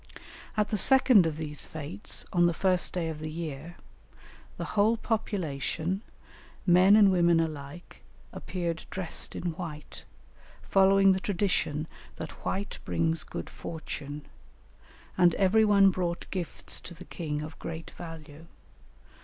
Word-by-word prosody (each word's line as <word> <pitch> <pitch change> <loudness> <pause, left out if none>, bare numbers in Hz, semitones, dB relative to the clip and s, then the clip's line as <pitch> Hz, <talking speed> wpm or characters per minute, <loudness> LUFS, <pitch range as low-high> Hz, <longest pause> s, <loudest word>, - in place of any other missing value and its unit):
At 210 -1 +2
the 210 - +1
second 255 -6 +6
of 155 -2 -3
these 150 -2 -5
fêtes, 160 +7 -5
on 175 -1 +5
the 170 - 0
first 185 -1 +3
day 175 -3 -2
of 155 -1 -6
the 155 0 -5
year, 160 0 -6 0.8
the - - -4
whole 215 +3 +3
population, 185 - -2 0.6
men 185 +3 +6
and 205 -2 +7
women 170 -2 +4
alike, 155 +1 -5 0.3
appeared 170 -3 -4
dressed 185 -3 -3
in 175 - -2
white, 150 -3 -8 0.6
following 195 0 +5
the 190 - +1
tradition 180 -6 0 0.3
that - - -8
white 200 +1 -3
brings 165 -1 0
good - - -6
fortune, 150 -2 -7 0.9
and 175 -2 +5
every 200 +3 +4
one 200 -2 +6
brought 175 -2 -2
gifts 180 -4 -5
to 175 - -10
the - - -11
king 150 -3 -4
of 155 +1 -9
great 165 0 -7
value. 165 -2 -10
175 Hz, 135 wpm, -28 LUFS, 160-195 Hz, 0.9 s, and